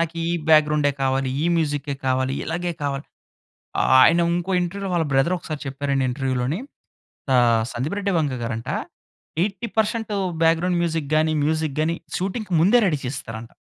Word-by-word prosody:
నాకు 170 0 -1
ఈ 170 - -1 0.2
బ్యాక్‌గ్రౌండే 150 -2 +4
కావాలి, 135 0 +1
ఈ - - 0
మ్యూజిక్కే 145 -2 -1
కావాలి 130 +1 +1
ఇలాగే 175 +2 -2
కావాలి. 140 0 -2 1.0
ఆయన 170 +6 +6 0.2
ఇంకో 175 +2 -2
ఇంటర్వ్యూలో 195 +2 -3
వాళ్ళ 165 -2 +1
బ్రదర్ 135 +7 +3
ఒకసారి 155 -2 -6
చెప్పారండి 135 0 -1
ఇంటర్వ్యూలోని 130 +4 -1 0.8
ఆహ్! 115 -2 +4
Sandeep 135 +11 -3
Reddy 200 -1 -1
Vanga 140 -5 -1
గారంట 115 0 -4 0.7
80 200 +2 -3
percent 220 0 0 0.3
background 165 +2 +2
music, 160 -4 -2
గాని, 155 0 +2
మ్యూజిక్ 155 -2 -1
గాని 165 +2 +1 0.2
షూటింగ్‌కి 195 +1 -3
ముందే 200 +8 +5
రెడీ 155 - +1
చేస్తారంట. 115 -3 -6
155 Hz, 145 wpm, -23 LUFS, 135-175 Hz, 1.0 s, ఆయన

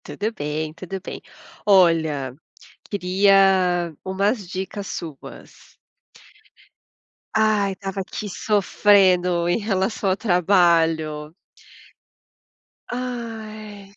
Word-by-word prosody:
Tudo 215 +2 -4
bem, 155 -2 -4
tudo 185 +3 -7
bem. 190 - -8 0.4
Olha, 160 -9 +3 0.5
queria 190 -3 +3
umas 200 +2 -1
dicas 190 +2 -5
suas. 155 -5 -10 1.6
Ai, 210 -3 +2
tava 195 0 -5
aqui 200 +2 -6
sofrendo 185 -4 +3
em 175 - +2
relação 200 -1 -1
ao 185 - +1
trabalho. 165 -6 +2 1.6
Ai. 220 -5 -7
190 Hz, 75 wpm, -22 LUFS, 170-205 Hz, 1.6 s, Olha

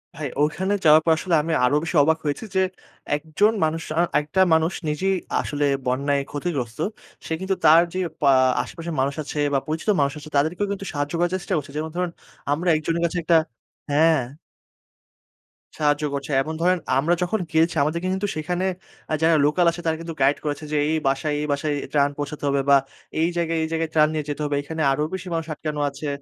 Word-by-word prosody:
ভাই, 150 -2 -4
ওখানে 190 +7 +1
যাওয়ার 155 +1 +7
পর 165 - +4
আসলে 175 -1 0
আমি 160 +2 -2
আরো 140 - +2
বেশি 165 +1 -4
অবাক 160 +2 +3
হয়েছি 145 +9 -2
যে, 190 - +4 0.5
একজন 160 +8 +1
মানুষ 160 +1 0 0.2
আ - - +6 0.2
একটা 150 +6 -3
মানুষ 160 +2 +2
নিজেই 190 +6 0 0.3
আসলে 145 -1 -1 0.2
বন্যায় 140 +3 +1
ক্ষতিগ্রস্ত। 140 -6 -3 0.5
সে - - -10
কিন্তু 190 0 0
তার 160 +2 +8
যে, 185 - -2 0.2
পা 140 - +4 0.3
আশেপাশের 165 +6 -6
মানুষ 140 +1 0
আছে 150 - -7 0.2
বা 135 - +3
পরিচিত 160 +7 -3
মানুষ 140 0 +2
আছে, 155 +1 -11
তাদেরকেও 175 +8 +1
কিন্তু 195 0 -4
সাহায্য 145 +1 -2
করার 175 +1 +1
চেষ্টা 190 +1 -4
করছে। 140 -1 -5
যেমন 155 +1 -3
ধরুন, 180 -1 -1 0.4
আমরা 170 +5 +1
একজনের 165 +2 -1
কাছে 170 +1 -2
একটা 165 0 +3 0.6
হ্যাঁ। 160 +2 +4 1.6
সাহায্য 150 0 +1
করছে। 140 +1 -4
এমন 155 +3 -4
ধরেন 180 +1 +3 0.2
আমরা 155 +6 +2
যখন 180 +5 0
গেয়েছি, 165 +1 +2
আমাদেরকে 170 +5 -1
কিন্তু 190 +2 -1
সেখানে 180 +4 -2 0.5
আ - - +1
যারা 165 0 +4
লোকাল 170 +4 +2
আছে, 175 - -7
তারা 160 0 +1
কিন্তু 165 0 -6
গাইড 140 +2 +4
করেছে, 150 0 -3
যে - - -1 0.2
"এই 160 - +2
বাসায়, 145 +2 0
এই 150 - -2
বাসায় 145 +1 -1 0.2
ত্রাণ 145 -1 +3
পৌঁছাতে 145 0 -5
হবে, 140 0 +1
বা 140 - +8 0.4
এই 165 - +3
জায়গায়, 165 -1 0
এই - - -1
জায়গায় 165 0 -1
ত্রাণ 155 -1 +5
নিয়ে 155 -1 -1
যেতে 145 - -3
হবে। 145 - -1
এখানে 160 +2 -5
আরো 140 +2 0
বেশি 190 0 -5
মানুষ 165 -1 -1
আটকানো 150 -1 -4
আছে 140 +2 -7
155 Hz, 195 wpm, -23 LUFS, 145-170 Hz, 1.6 s, তার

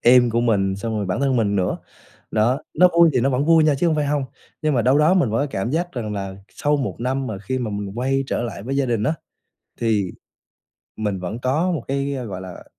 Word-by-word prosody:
em 120 0 +6
của 115 +1 +1
mình, 95 -5 +1
xong 110 +2 -3
rồi 100 -2 -2
bản 95 +8 -1
thân 135 -2 +2
mình 100 -3 +1
nữa, 90 -1 0 0.5
đó. 115 +5 +2 0.2
Nó 180 +3 +6
vui 170 -1 +7
thì 125 - +2
nó 135 +3 +2
vẫn 130 +3 +1
vui 165 -1 +5
nha 150 -2 +4
chứ 170 +6 +1
hông 160 -2 +2
phải 150 -1 0
hông, 145 -1 0 0.4
nhưng 155 -2 +1
mà 120 - +2
đâu 130 +4 +4
đó 160 +5 +4
mình 140 - +2
vẫn 115 - +1
có 145 - +1
cảm 95 +3 -2
giác 175 +3 -1
rằng 110 -5 -4
là 95 -1 -4
sau 145 0 0
một 135 - -3
năm 130 +2 -1
mà 105 -5 -4
khi 130 +7 -3
mà 115 -4 -3
mình 100 +2 -5
quay 135 +2 +1
trở - - -1
lại 105 -4 -5
với 135 +4 -3
gia 140 -2 +1
đình 115 -3 0
á, 155 +9 +1 0.7
thì 105 -5 +1 0.9
mình 105 -3 -2
vẫn 95 +6 -4
có 150 +9 +1
một 145 -8 -3
cái, 140 +1 -1
gọi 95 -3 -6
là, 95 -1 -9
125 Hz, 255 wpm, -22 LUFS, 105-140 Hz, 0.9 s, vui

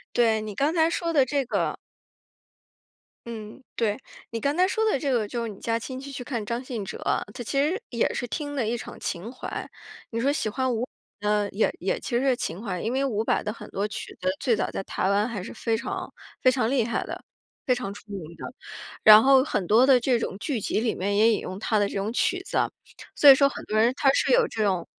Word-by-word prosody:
对， 225 -3 +3
你 210 -2 -6
刚 290 - +1
才 325 0 +3
说 335 -1 -1
的 285 -5 +4
这 280 +2 0
个 - - -1 1.5
嗯， 220 +2 -8
对， 215 -3 +1 0.3
你 230 -1 -4
刚 285 +5 0
才 365 - +4
说 440 +4 0
的 - - +1
这 275 -1 -1
个 220 -4 +1
就 235 +1 -3
是 230 - -3
你 200 - -9
家 230 0 0
亲 260 +2 -6
戚 280 +1 -8
去 250 -2 -6
看 235 -4 -3
张 235 +4 -3
信 235 -6 -4
哲， - - -7 0.3
他 240 - -7
其 - - -5
实 355 +9 0
也 235 -2 +1
是 245 - -3
听 290 +3 -4
的 240 - 0
一 235 +2 0
场 - - -9
情 185 +6 -4
怀。 255 - -6 0.4
你 230 - -3
说 280 +3 +2
喜 225 - -1
欢 255 +3 -1
伍 225 - -2 0.4
佰 210 - -1
呢， 210 -1 +2
也 210 - +1
也 185 - -1
其 240 - -2
实 - - -1
是 265 -2 +4
情 175 -4 -4
怀。 180 -5 -3
因 230 - -1
为 270 +1 +1
伍 220 -5 0
佰 - - +1
的 210 - -2
很 230 - -11
多 200 +2 -1
曲 210 - -7
子， 185 - -1
最 235 -4 +2
早 - - -1
在 - - -3
台 190 - -2
湾 205 +3 +2
还 220 -5 -4
是 - - -8
非 225 -1 0
常 - - -5 0.3
非 255 - +6
常 250 -3 0
厉 255 -4 +2
害 235 - -2
的， - - -7 0.4
非 255 - +2
常 220 -5 -4
出 - - -12
名 195 -2 -4 0.2
的。 - - -7 0.5
然 215 0 +10
后 265 0 +6
很 205 -9 -1
多 235 +5 +6
的 265 -2 +6
这 245 -1 +2
种 190 - -3
剧 250 -1 -2
集 210 - -1
里 230 -1 +1
面 200 +2 -1
也 220 +2 +5
引 - - +1
用 185 +2 -6
他 220 -1 +1
的 205 - +3
这 - - -8
种 200 +3 -2
曲 - - +1
子。 - - -2 0.6
所 290 - +8
以 270 - +9
说 280 0 +5
很 - - -8
多 215 - 0
人 235 +3 +4
他 270 -1 +4
是 - - +2
有 - - +4
这 220 -1 -1
种 185 -4 0
235 Hz, 270 characters per minute, -26 LUFS, 210-265 Hz, 1.5 s, 然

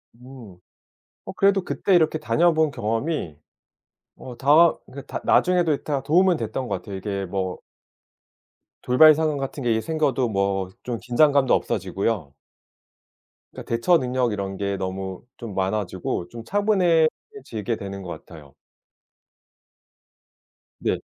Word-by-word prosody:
음. 120 -6 -13 0.7
어 - - -6
그래도 195 0 +2
그때 190 - -1
이렇게 160 -2 +3
다녀 165 +10 +2
본 155 -2 +2
경험이 115 - -3 0.8
어 125 -2 -9
다 155 +5 +5
그러니까 140 - -10 0.2
다 - - -9
나중에도 175 -4 +3
이 - - -5
다 140 -3 -2
도움은 175 +4 +3
됐던 115 +3 -4
것 100 - -1
같아요. 100 -2 -8
이게 100 0 -4
뭐 95 0 -3 1.2
돌발 155 +5 +7
상황 155 -1 0
같은 135 +1 -5
게 120 - +1
이제 110 0 +1
생겨도 145 -6 0
뭐 100 -2 -1
좀 120 -2 -3
긴장감도 140 +2 +3
없어지고요. 95 -5 -1 1.2
그러니까 - - -11
대처 170 +9 +4
능력 125 -3 -1
이런 100 -1 -4
게 100 -1 -2
너무 95 +1 -5
좀 115 -4 -8
많아지고 95 -2 -2
좀 115 -1 -9
차분해지게 180 - 0
되는 100 0 -7
것 90 - -8 0.2
같아요. 75 -5 -14 2.3
네. - - -1
120 Hz, 270 characters per minute, -23 LUFS, 100-155 Hz, 2.3 s, 돌발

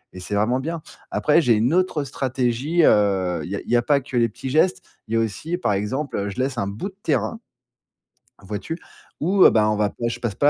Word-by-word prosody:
et - - -7
c'est 90 +3 -4
vraiment 115 +5 +1
bien. 160 +3 -4 0.3
Après, 150 +3 +3
j'ai 125 -7 +4
une 120 +8 +1
autre 180 -5 +1
stratégie, 135 +4 0
heu, 95 -5 +2
il 90 - -7
y 100 - -1
a - - -6
il - - -13
y 120 - +3
a 120 - +4
pas 140 +2 +2
que 130 -1 -9
les 115 -2 +3
petits 130 +5 -7
gestes, 160 +6 +2 0.2
il 110 - -2
y - - +3
a - - +3
aussi, 115 - -2
par 110 - 0
exemple, 105 0 -2
je 110 - -7
laisse 130 0 -1
un 100 -4 -1
bout 105 - -4
de 190 - -21
terrain, 230 - 0 1.0
vois-tu? 105 - -5 0.4
Où, 185 +5 +4
heu, - - +9
bah, 110 -1 +3
on 105 - 0
va 105 -1 +1
pas 115 - -4
je 115 - -5
passe 115 -5 -2
pas 145 - +4
120 Hz, 245 wpm, -22 LUFS, 105-150 Hz, 1.0 s, heu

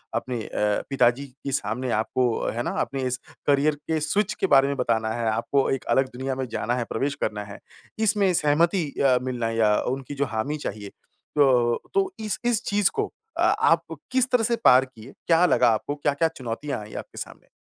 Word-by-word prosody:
अपने 125 -2 -2
अ, 105 0 0
पिताजी 135 0 +2
के 135 +1 -8
सामने 125 0 -2
आपको 110 +4 0 0.3
है 120 +1 -3
ना, - - -2
आपने 135 -1 -3
इस 125 0 -1 0.3
करियर 145 +1 +3
के 160 -1 0
स्विच 200 +7 0
के - - -1
बारे 135 -1 +5
में 140 - -1
बताना 115 -3 0
है, 115 -1 -2
आपको 135 +5 0
एक 135 - -1
अलग 135 0 +3
दुनिया 130 +1 -3
में 130 0 -3
जाना 120 +2 -1
है, 125 - -1
प्रवेश 140 +1 -1
करना 105 -1 -2
है। 100 0 -10 0.4
इसमें 205 -3 +3
सहमति 165 +3 +2 0.2
अ, 130 -2 +4
मिलना 125 -3 -2
है 115 0 -3
या 105 -2 +4 0.2
उनकी 135 +1 -8
जो 140 - 0
हामी 140 +8 -1
चाहिए, 100 0 -6 0.5
तो 125 -5 +3
तो 390 -1 +1
इस 215 -2 -2
इस 240 -1 +1
चीज़ 205 -1 +2
को - - -2 0.3
अ, - - -1
आप - - +3 0.3
किस 260 0 +2
तरह 245 -2 +3
से 235 +2 +2
पार 130 +1 +7
किए, 130 0 -14
क्या 170 +1 +5
लगा 125 -8 +4
आपको, 115 +6 -1
क्या-क्या 145 +2 +1
चुनौतियाँ 130 +3 -4
आई 105 - -11
आपके - - -19
सामने? - - -8
135 Hz, 200 wpm, -25 LUFS, 120-155 Hz, 0.5 s, पार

